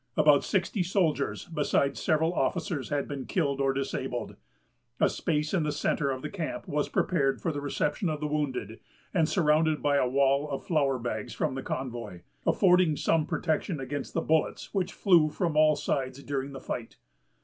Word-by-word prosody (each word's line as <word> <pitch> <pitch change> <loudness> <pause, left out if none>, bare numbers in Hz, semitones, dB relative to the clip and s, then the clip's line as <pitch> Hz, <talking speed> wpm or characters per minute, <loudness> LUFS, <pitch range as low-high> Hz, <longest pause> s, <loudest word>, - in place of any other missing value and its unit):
About 150 -2 +5
sixty 195 +1 0
soldiers, 170 -6 0
besides 145 -3 0
several 160 +2 +2
officers, 170 -6 -1
had 145 -1 -1
been 140 -2 -5
killed 140 -6 0
or 135 0 +3
disabled. 135 0 -3 0.6
A - - +5
space 150 0 -1
in 185 - +2
the 150 -1 0
centre 145 -1 0
of 130 -1 -3
the - - -3
camp 165 -9 -4
was 150 0 -1
prepared 140 -7 +1
for 165 - -1
the 145 -2 -4
reception 145 +4 -1
of 155 -1 -2
the 150 - -3
wounded, 135 -7 -2 0.3
and 165 -3 +2
surrounded 155 -3 +3
by 145 -1 +3
a 130 -2 +2
wall 140 +2 +2
of 140 +4 -4
flour 145 -8 +2
bags 115 -1 -4
from - - -1
the 135 - -4
convoy, 120 -9 -5 0.3
affording 180 -5 +4
some 160 -2 +1
protection 160 0 -1
against 135 +1 -5
the 165 - +2
bullets 160 -1 0
which 190 -3 0
flew 170 -6 +4
from 165 0 -1
all 155 0 +5
sides 135 -1 -2
during 140 -1 -3
the 135 - -6
fight. 120 -2 -6
150 Hz, 180 wpm, -28 LUFS, 135-160 Hz, 0.6 s, About